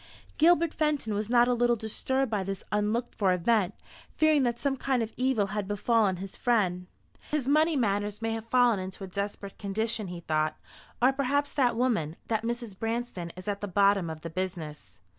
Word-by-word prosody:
Gilbert 335 Hz, 0 st, +4 dB
Fenton 295 Hz, -8 st, 0 dB
was 210 Hz, +1 st, -2 dB
not 240 Hz, 0 st, +5 dB
a 250 Hz, -, +3 dB
little 240 Hz, 0 st, +3 dB
disturbed 255 Hz, +4 st, -1 dB
by 205 Hz, -3 st, 0 dB
this 195 Hz, 0 st, -5 dB
unlooked 215 Hz, +3 st, 0 dB
for 195 Hz, -4 st, +2 dB
event, 195 Hz, +1 st, +1 dB, 0.4 s
fearing 310 Hz, -2 st, +4 dB
that 240 Hz, -2 st, +1 dB
some 275 Hz, +2 st, 0 dB
kind 260 Hz, -2 st, 0 dB
of 225 Hz, -, -6 dB
evil 255 Hz, -5 st, +1 dB
had 210 Hz, -2 st, -2 dB
befallen 205 Hz, -1 st, +2 dB
his 190 Hz, +1 st, -7 dB
friend. 185 Hz, -7 st, +1 dB, 0.4 s
"His 295 Hz, -4 st, -1 dB
money 310 Hz, +3 st, +3 dB
matters 205 Hz, -4 st, 0 dB
may 225 Hz, 0 st, -2 dB
have 225 Hz, 0 st, -4 dB
fallen 245 Hz, -3 st, +4 dB
into 185 Hz, +1 st, -6 dB
a -, -, -5 dB
desperate 200 Hz, +1 st, -5 dB
condition," 215 Hz, +1 st, -2 dB
he 175 Hz, -1 st, -7 dB
thought; 155 Hz, -1 st, 0 dB, 0.5 s
"or 260 Hz, +2 st, +6 dB
perhaps 285 Hz, +2 st, 0 dB
that 250 Hz, -5 st, +2 dB
woman 220 Hz, -11 st, 0 dB
that 220 Hz, -2 st, +1 dB
Mrs. 235 Hz, -3 st, -4 dB
Branston, 225 Hz, -7 st, -3 dB
is 185 Hz, +2 st, -10 dB
at 200 Hz, -1 st, -2 dB
the 205 Hz, -, -3 dB
bottom 200 Hz, -2 st, +3 dB
of 160 Hz, -1 st, -7 dB
the 165 Hz, -, -6 dB
business." 165 Hz, -, -5 dB
220 Hz, 190 wpm, -28 LUFS, 195-245 Hz, 0.5 s, or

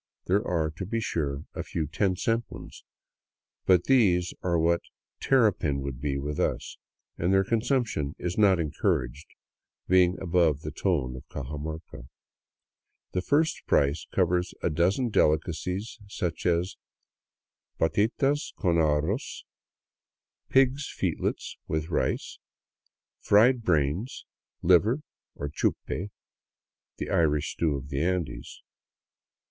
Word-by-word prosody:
There 100 Hz, +4 st, +2 dB
are, 80 Hz, -3 st, 0 dB
to 95 Hz, -, -4 dB
be 115 Hz, +2 st, -1 dB
sure, 75 Hz, -9 st, -2 dB
a -, -, -4 dB
few 80 Hz, -, -3 dB
ten 95 Hz, +5 st, 0 dB
cent 115 Hz, +5 st, -1 dB
ones, -, -, -11 dB, 0.8 s
but 90 Hz, -2 st, +5 dB
these 95 Hz, -9 st, +3 dB
are 85 Hz, -2 st, +1 dB
what 85 Hz, +1 st, +2 dB, 0.4 s
terrapin 105 Hz, -, +2 dB
would 70 Hz, -2 st, -5 dB
be 70 Hz, -1 st, -1 dB
with 75 Hz, +1 st, -4 dB
us, -, -, -2 dB, 0.4 s
and 85 Hz, +3 st, +1 dB
their 95 Hz, 0 st, +4 dB
consumption 115 Hz, -, 0 dB
is 90 Hz, 0 st, -3 dB
not 100 Hz, -4 st, +4 dB
encouraged, 70 Hz, -3 st, -1 dB, 0.6 s
being 90 Hz, 0 st, +4 dB
above 85 Hz, -5 st, +2 dB
the 75 Hz, -, -5 dB
tone 75 Hz, -6 st, -1 dB
of 65 Hz, -, -11 dB
Cajamarca. 75 Hz, -2 st, -6 dB, 1.0 s
The 90 Hz, -, -1 dB
first 150 Hz, -, +1 dB
price 70 Hz, +2 st, +2 dB
covers 90 Hz, -1 st, +1 dB
a 85 Hz, -, +1 dB
dozen 95 Hz, -, +1 dB
delicacies, 90 Hz, +5 st, 0 dB
such 90 Hz, -5 st, -3 dB
as 90 Hz, +2 st, 0 dB, 0.5 s
*' -, -, -59 dB
patitas 125 Hz, -, +1 dB
con 85 Hz, -4 st, +1 dB
arroz 80 Hz, -, 0 dB, 0.5 s
— -, -, -62 dB
pigs* 135 Hz, +1 st, +3 dB
f -, -, -18 dB
eetlets -, -, -2 dB
with 80 Hz, +1 st, -2 dB
rice," 80 Hz, -, -1 dB, 0.8 s
fried 120 Hz, +4 st, +4 dB
brains, 85 Hz, -, 0 dB, 0.4 s
liver, 105 Hz, -, +4 dB, 0.3 s
or 70 Hz, -, -4 dB
chupe, 90 Hz, +6 st, -2 dB, 0.9 s
the -, -, -4 dB
Irish 75 Hz, -1 st, +2 dB
stew 80 Hz, -4 st, 0 dB
of 70 Hz, 0 st, -6 dB
the 70 Hz, -1 st, -2 dB
Andes. 85 Hz, -8 st, -3 dB
85 Hz, 125 wpm, -27 LUFS, 75-100 Hz, 1.0 s, but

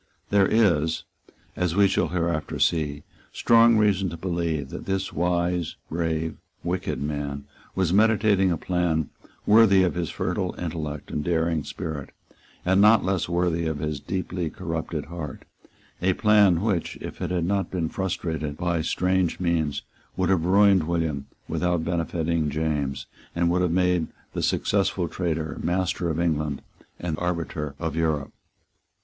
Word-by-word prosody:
There 100 Hz, -1 st, +5 dB
is, 85 Hz, -8 st, +2 dB, 0.5 s
as 90 Hz, -2 st, 0 dB
we 100 Hz, 0 st, +6 dB
shall -, -, +1 dB
hereafter 85 Hz, -3 st, -1 dB
see, 75 Hz, -3 st, +1 dB, 0.3 s
strong 115 Hz, -1 st, +5 dB
reason 100 Hz, -3 st, +2 dB
to 85 Hz, -, -7 dB
believe 85 Hz, -5 st, -2 dB
that -, -, -7 dB
this 95 Hz, 0 st, -1 dB
wise, 90 Hz, -1 st, 0 dB, 0.2 s
brave, 80 Hz, -1 st, -1 dB, 0.3 s
wicked 90 Hz, +1 st, -2 dB
man, 70 Hz, -1 st, -3 dB, 0.3 s
was 95 Hz, -2 st, +1 dB
meditating 105 Hz, -2 st, +4 dB
a 85 Hz, -, 0 dB
plan 85 Hz, -3 st, 0 dB, 0.3 s
worthy 105 Hz, -3 st, +6 dB
of 90 Hz, -, +1 dB
his 85 Hz, -3 st, -2 dB
fertile 90 Hz, -, -2 dB
intellect 80 Hz, -4 st, -5 dB
and 75 Hz, -, -2 dB
daring 80 Hz, -2 st, 0 dB
spirit, 75 Hz, -2 st, -5 dB, 0.6 s
and 95 Hz, +2 st, +4 dB
not 105 Hz, 0 st, +6 dB
less 95 Hz, -2 st, 0 dB
worthy 85 Hz, -1 st, +1 dB
of 80 Hz, -2 st, -2 dB
his 75 Hz, -1 st, -3 dB
deeply 90 Hz, +1 st, -3 dB
corrupted 80 Hz, -1 st, -4 dB
heart, 80 Hz, -3 st, -7 dB, 0.6 s
a 95 Hz, +1 st, +3 dB
plan 100 Hz, -4 st, +4 dB
which, 100 Hz, -6 st, -1 dB
if -, -, -8 dB
it -, -, -1 dB
had 90 Hz, -2 st, 0 dB
not 100 Hz, +1 st, 0 dB
been 85 Hz, -3 st, -1 dB
frustrated 80 Hz, -5 st, -3 dB
by 85 Hz, -2 st, 0 dB
strange 90 Hz, +2 st, 0 dB
means, 80 Hz, -5 st, 0 dB, 0.3 s
would 95 Hz, -2 st, +1 dB
have 90 Hz, -4 st, +2 dB
ruined 95 Hz, -2 st, +5 dB
William 80 Hz, -5 st, -1 dB, 0.2 s
without 90 Hz, -2 st, 0 dB
benefiting 85 Hz, -2 st, 0 dB
James, 70 Hz, -4 st, -2 dB, 0.3 s
and 85 Hz, 0 st, +2 dB
would 90 Hz, +1 st, +2 dB
have 90 Hz, -, +2 dB
made 90 Hz, -1 st, +2 dB, 0.3 s
the -, -, -2 dB
successful 95 Hz, -3 st, +1 dB
traitor 80 Hz, -2 st, -3 dB
master 90 Hz, 0 st, 0 dB
of 80 Hz, 0 st, -1 dB
England 75 Hz, -4 st, -1 dB, 0.4 s
and 80 Hz, -3 st, -3 dB
arbiter 85 Hz, -4 st, -3 dB
of 80 Hz, 0 st, -3 dB
Europe. 80 Hz, -4 st, -1 dB
85 Hz, 145 wpm, -25 LUFS, 80-95 Hz, 0.6 s, we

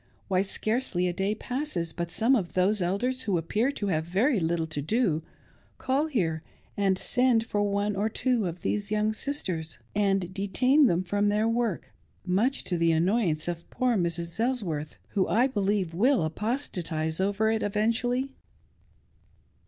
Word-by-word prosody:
Why, 185 Hz, -1 st, +3 dB
scarcely 205 Hz, -2 st, -1 dB
a 175 Hz, -, -1 dB
day 195 Hz, +4 st, -1 dB
passes 245 Hz, -, -3 dB
but 170 Hz, -1 st, -3 dB
some 230 Hz, +9 st, +3 dB
of 190 Hz, -8 st, -2 dB
those 190 Hz, +3 st, +2 dB
Elders, 245 Hz, +9 st, 0 dB
who 195 Hz, -5 st, +1 dB
appear 215 Hz, -, 0 dB
to 205 Hz, -, -3 dB
have 160 Hz, -3 st, +1 dB
very 205 Hz, -, +2 dB
little 165 Hz, -1 st, 0 dB
to 155 Hz, -2 st, -4 dB
do, 165 Hz, -, +1 dB, 0.6 s
call 275 Hz, +4 st, 0 dB
here 170 Hz, -, -1 dB, 0.3 s
and 195 Hz, -2 st, +2 dB
send 245 Hz, +1 st, +2 dB
for 205 Hz, -2 st, -1 dB
one 205 Hz, 0 st, 0 dB
or 205 Hz, +3 st, 0 dB
two 240 Hz, -3 st, 0 dB
of 175 Hz, +1 st, -7 dB
these 205 Hz, -1 st, -1 dB
young 215 Hz, 0 st, +1 dB
sisters, 185 Hz, -, -3 dB, 0.2 s
and 195 Hz, -3 st, +1 dB
detain 250 Hz, +9 st, +3 dB
them 175 Hz, -3 st, +1 dB
from 205 Hz, +3 st, +1 dB
their 210 Hz, +2 st, +2 dB
work, 230 Hz, -4 st, -1 dB, 0.3 s
much 210 Hz, +9 st, +1 dB
to 175 Hz, -2 st, -2 dB
the 165 Hz, 0 st, +3 dB
annoyance 170 Hz, -1 st, +1 dB
of 170 Hz, -1 st, -5 dB
poor 250 Hz, -2 st, +1 dB
Mrs. 170 Hz, -1 st, -2 dB
Elsworth, 195 Hz, -, -1 dB
who 190 Hz, -2 st, +1 dB
I 240 Hz, +4 st, +3 dB
believe 200 Hz, -7 st, 0 dB
will 240 Hz, -, +3 dB
apostatise 165 Hz, -, -2 dB
over 205 Hz, +3 st, +1 dB
it 220 Hz, 0 st, 0 dB
eventually. 230 Hz, +5 st, 0 dB
205 Hz, 160 wpm, -27 LUFS, 175-235 Hz, 0.6 s, Why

